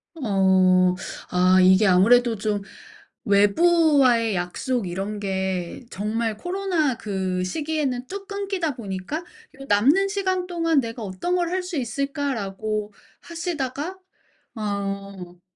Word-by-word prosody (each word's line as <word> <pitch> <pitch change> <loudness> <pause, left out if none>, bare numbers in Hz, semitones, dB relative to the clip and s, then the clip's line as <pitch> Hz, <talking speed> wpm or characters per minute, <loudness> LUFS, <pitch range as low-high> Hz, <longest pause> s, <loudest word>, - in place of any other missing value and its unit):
어. 190 - +3 0.4
아 185 +1 +4
이게 190 +3 +5
아무래도 230 +6 +5
좀 205 -1 -2 0.6
외부와의 245 - +4
약속 185 +5 -2
이런 195 +4 -4
게 190 +2 -3
정말 215 +2 -2
코로나 355 - -1
그 190 -3 -2
시기에는 285 0 -2
뚝 395 +1 -7
끊기다 390 - -2
보니까 200 - -5
'요 355 -7 -15
남는 285 - +4
시간 375 -2 -1
동안 330 -4 +1
내가 230 -1 -6
어떤 200 - -2
걸 350 -1 +1
할 370 0 -1
수 360 -4 -5
있을까?'라고 220 -6 -3 0.3
하시다가 330 0 -4 0.6
어. 195 -4 -5
230 Hz, 230 characters per minute, -23 LUFS, 195-325 Hz, 0.6 s, 이게